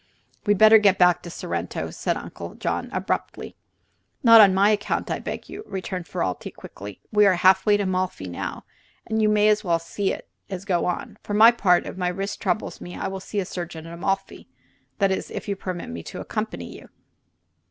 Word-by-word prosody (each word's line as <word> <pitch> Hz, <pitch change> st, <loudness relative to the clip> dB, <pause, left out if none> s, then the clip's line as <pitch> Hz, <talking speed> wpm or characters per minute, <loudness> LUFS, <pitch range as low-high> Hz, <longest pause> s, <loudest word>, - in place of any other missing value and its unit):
"We'd 205 Hz, -1 st, +4 dB
better 220 Hz, +1 st, +8 dB
get 200 Hz, -2 st, +4 dB
back 180 Hz, -1 st, +4 dB
to 175 Hz, -, -9 dB
Sorrento," -, -, -4 dB
said -, -, -2 dB
Uncle -, -, -8 dB
John, -, -, -3 dB
abruptly. -, -, -3 dB, 0.7 s
"Not 230 Hz, -2 st, +9 dB
on 200 Hz, -2 st, +7 dB
my 195 Hz, +3 st, +4 dB
account, 205 Hz, -1 st, -1 dB
I -, -, -1 dB
beg -, -, -5 dB
of -, -, -23 dB
you," 405 Hz, +2 st, -8 dB
returned 185 Hz, -2 st, -5 dB
Ferralti, 95 Hz, -10 st, -3 dB
quickly. 100 Hz, 0 st, -10 dB
"We 210 Hz, -1 st, +5 dB
are 190 Hz, -, +4 dB
half 190 Hz, +3 st, +4 dB
way 205 Hz, -1 st, +5 dB
to 205 Hz, -, -1 dB
Amalfi 185 Hz, -, -2 dB
now, 85 Hz, -, -6 dB, 0.4 s
and 220 Hz, 0 st, -1 dB
you 215 Hz, -, +4 dB
may 210 Hz, 0 st, +4 dB
as 215 Hz, 0 st, +3 dB
well 170 Hz, -3 st, +1 dB, 0.9 s
go 180 Hz, -4 st, +1 dB
on. 210 Hz, +3 st, -4 dB
For 205 Hz, -, -4 dB
my 225 Hz, +3 st, +8 dB
part, 180 Hz, -7 st, +2 dB
if -, -, -7 dB
the 180 Hz, -1 st, -1 dB
wrist 195 Hz, +1 st, -4 dB
troubles 190 Hz, +2 st, -2 dB
me, 175 Hz, -, -8 dB
I -, -, -3 dB
will 190 Hz, 0 st, -5 dB
see 200 Hz, +2 st, -4 dB
a 190 Hz, -, -1 dB
surgeon 170 Hz, -3 st, -6 dB
at 165 Hz, -, -9 dB
Amalfi 195 Hz, +3 st, -3 dB, 0.5 s
that 195 Hz, -2 st, +2 dB
is, 190 Hz, -, -2 dB
if -, -, -6 dB
you 200 Hz, -, -1 dB
permit 185 Hz, -, -6 dB
me 85 Hz, 0 st, -6 dB
to -, -, -8 dB
accompany -, -, -5 dB
you." -, -, -13 dB
190 Hz, 200 wpm, -24 LUFS, 180-210 Hz, 0.9 s, Not